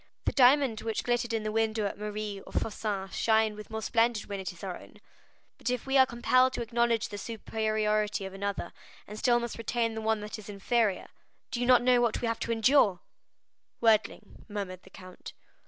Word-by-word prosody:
The - - +2
diamond 260 -3 +4
which 225 -1 -2
glittered 240 -1 0
in 225 -1 -1
the 215 - -2
window 220 -1 0
at 200 - -3
Marlé's 210 -1 -5
or - - -12
Fossin's 205 -3 -3
shines 220 -1 +2
with 210 0 -10
more 220 0 -5
splendor 230 0 +1
when 200 -1 -5
it 190 -1 -4
is 175 +1 -15
our 185 -2 -4
own; - - -14 0.6
but - - -2
if 250 -2 -2
we 270 0 -1
are 260 -1 +7
compelled 255 +1 +3
to - - -2
acknowledge 235 -1 0
the 205 - -6
superiority 215 -2 -1
of 190 - -7
another, 200 -2 -4 0.3
and 210 +1 -8
still 240 -1 +3
must 235 -1 -5
retain 230 0 -1
the 220 - -5
one 220 0 +1
that 210 +1 -6
is 210 - -11
inferior, 205 0 0 0.4
do 240 - -2
you 245 - 0
not 250 -1 +6
know 250 -1 +4
what 235 -2 +1
we 240 - -2
have 230 0 -1
to - - -3
endure?" 225 -5 +3 0.8
"Worldling," 220 -2 +1
murmured 195 -3 -5
the - - -17
count. 185 -1 -11
220 Hz, 205 wpm, -29 LUFS, 205-235 Hz, 0.8 s, are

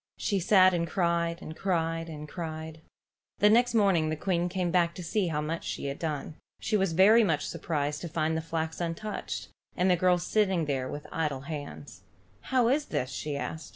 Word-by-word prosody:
She 200 -3 0
sat 185 0 +5
and 170 -1 0
cried 170 -1 0
and 155 - -7
cried 165 -3 -1
and 150 -1 -7
cried. 160 -1 -6 0.6
The 210 +1 +5
next 240 +1 +4
morning 190 -7 +3
the 155 - -1
Queen 175 +1 0
came 180 -1 -1
back 170 -1 +2
to 180 - -7
see 185 +3 0
how 150 -2 -1
much 160 +2 -3
she - - -4
had 140 0 -4
done. 155 -1 -4 0.2
She 220 - -1
was 195 -4 +1
very 210 +7 +6
much 160 -8 +1
surprised 150 -2 -2
to 170 - -5
find 155 0 0
the 160 - -1
flax 160 0 -3
untouched, 170 +5 -4 0.3
and 185 +1 +3
the - - +5
girl 180 +1 +3
sitting 190 -2 +1
there 135 -3 -2
with 145 - -6
idle 150 -5 -1
hands. 145 0 -8 0.5
"How 255 -3 +3
is 290 +3 +2
this?" 130 - -2
she 145 +3 -3
asked. 160 +3 -5
165 Hz, 195 wpm, -29 LUFS, 155-185 Hz, 0.6 s, very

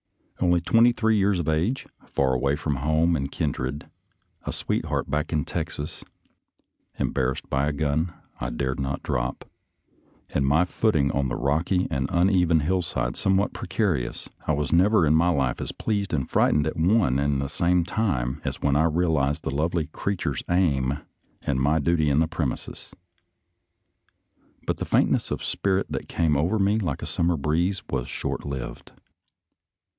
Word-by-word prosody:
Only 90 -1 +3
twenty 115 +7 +5
three 110 -2 +1
years 100 -1 +2
of 85 -3 -3
age, 85 +12 0 0.2
far 65 -1 +1
away 70 +3 +1
from 75 -2 -2
home 80 +4 +2
and 70 -2 -2
kin - - -1
dred, 65 +3 -4 0.6
a - - -3
sweetheart - - -2
back 75 +3 -1
in 75 -3 0
Texas, 75 +1 -5 0.9
embarrassed 65 0 -1
by 70 +2 +1
a - - +1
gun 75 +3 0 0.3
I - - -2
dared 65 +2 -2
not 70 0 -3
drop, - - -2 0.9
and 70 - +1
my 75 +6 +3
footing 80 -8 +1
on 70 -1 0
the - - -2
rocky 85 +6 +1
and 65 0 -1
uneven 90 -2 +3
hillside 75 -8 -1
somewhat 95 +1 +1
precarious, 85 - -2 0.2
I 80 - +3
was 75 0 -1
never 95 +1 +5
in 75 - +3
my 85 +3 +4
life 65 -7 0
as - - -3
pleased 100 -3 -2
and 70 -5 -1
frightened 75 -1 +3
at 80 - -2
one 85 - +3
and 70 -1 +1
the 70 - -1
same 85 +4 +2
time 75 - -1
as - - -3
when 70 -1 +3
I 80 +2 +4
realized 80 -3 +1
the - - -2
lovely 80 +3 0
creature's 85 -2 -3
aim 70 -7 +2 0.5
and 70 -3 0
my 75 +4 +3
duty 80 0 +2
in 70 - +2
the 80 +1 +3
prem 80 -5 -1
ises. - - -8 1.7
But - - -1
the - - -3
faintness - - +2
of - - -3
spirit 95 -1 0
that - - -4
came 80 -3 +1
over 85 +9 +1
me 100 +2 +2
like 85 -10 -3
a - - -2
summer 85 0 0
breeze, 85 +7 0
was 65 -3 -1
as - - -11
short - - -3
lived. 70 -3 -6
80 Hz, 170 wpm, -25 LUFS, 70-90 Hz, 1.7 s, twenty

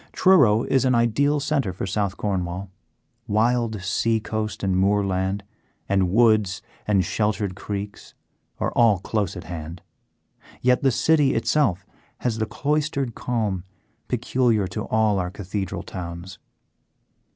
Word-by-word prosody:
Truro 135 - +5
is 130 -2 +2
an 130 -1 +3
ideal 140 +6 +2
centre 140 -7 0
for 90 - -5
South 95 0 -1
Cornwall. 95 -1 -3 0.6
Wild 110 -1 +1
sea 110 +4 +1
coast 110 0 -4
and 95 -1 +1
moorland, 95 0 +1 0.4
and 95 -2 +2
woods 110 -2 +3 0.2
and 100 -4 +3
sheltered 105 0 -1
creeks, 100 +1 -6 0.4
are - - 0
all 115 -4 +4
close 100 0 -2
at 90 - -7
hand, 85 0 -7 0.8
yet 125 0 +3
the 135 - +4
city 145 +2 +3
itself 100 - +1 0.4
has 115 -3 -1
the 110 - 0
cloistered 140 +1 -1
calm 110 -8 -2 0.4
peculiar 120 -3 +1
to 90 - -4
all 110 -2 +2
our 90 -1 -2
cathedral 95 0 -4
towns. 85 +1 -7
105 Hz, 130 wpm, -23 LUFS, 95-120 Hz, 0.8 s, Truro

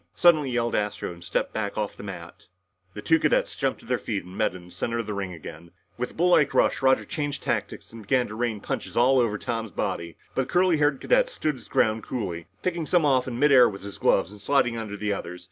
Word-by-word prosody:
suddenly 155 -6 +5
yelled 120 -1 0
Astro 105 -3 -2
and 85 0 -14
stepped 85 - -2
back 105 -2 -3
off 105 -1 -2
the - - -10
mat. 90 -4 -9 0.5
The 105 - -7
two 160 +6 +4
cadets 150 - +1
jumped 135 -2 -1
to - - -17
their 125 +1 0
feet 105 -4 -3
and 90 +1 -11
met 110 -4 0
in 90 -1 -10
the 90 - -16
center 115 +6 -3
of 115 - -2
the 105 - -4
ring 100 -2 -3
again. 80 0 -10 0.3
With 125 - -3
a - - -16
bull 175 +2 +2
like 150 -5 +4
rush, - - +3
Roger 130 0 +3
changed 145 -2 -4
tactics - - -3
and 115 - -9
began 125 +4 +1
to - - -7
rain 110 -2 -2
punches - - -4
all 130 +2 +5
over 110 -4 +1
Tom's 115 -1 -3
body, 85 -2 -3 0.2
but 130 - -1
the - - -10
curly 180 -2 +4
haired 145 -2 +2
cadet - - +3
stood 155 - -1
his 125 -5 -13
ground 110 0 +2
coolly, 90 -9 -4 0.2
picking 170 -3 -1
some 175 -4 +3
off 130 -3 +3
in 120 -2 -4
mid 145 +3 +4
air 125 -3 +7
with 100 -2 -9
his 100 -4 -8
gloves 95 - +2
and 105 -1 -13
sliding 125 0 +2
under 110 -3 -5
the 105 0 -1
others. 90 -2 -6
115 Hz, 250 wpm, -26 LUFS, 100-135 Hz, 0.5 s, air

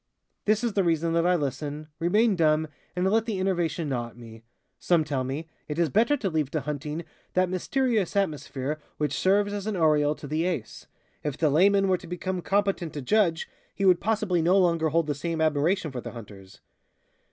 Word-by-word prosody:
This 215 +2 +2
is 235 -3 0
the 195 - +2
reason 165 -1 +1
that 170 +1 +2
I 180 - +4
listen, 145 0 -3
remain 205 +6 +3
dumb, 155 -2 +2 0.3
and 180 +1 0
let 225 +1 +2
the 210 -4 -2
enervation 175 -4 0
gnaw 120 -3 -2
at 120 - -16
me. 115 -2 -12 0.4
Some 170 -3 +2
tell 140 -4 -2
me: 140 +5 -4 0.2
"It 150 - -4
is 170 -2 +2
better 235 +8 +3
to 225 - -2
leave 155 -6 0
to 155 - 0
hunting 150 +3 -4 0.3
that 185 0 +3
mysterious 220 +1 0
atmosphere 150 -5 -2 0.2
which 150 -2 -1
serves 205 +5 +2
as 205 0 -4
an 215 - -1
aureole 150 -3 +3
to - - -10
the 155 +4 -1
Ace. 155 -12 -4 0.4
If 145 -3 -3
the 155 -3 +2
layman 195 +5 +4
were 185 -1 +2
to - - -12
become 180 +1 -3
competent 195 -4 0
to 145 - -5
judge, 175 -1 +2 0.3
he 195 - -1
would 180 -2 +5
possibly 210 -5 +1
no 180 +4 +4
longer 170 -4 +3
hold 165 +1 +2
the 150 - -1
same 165 +3 -3
admiration 155 +2 +1
for 125 -2 -5
the - - -8
hunters." 100 -5 -12
165 Hz, 200 wpm, -26 LUFS, 150-190 Hz, 0.4 s, would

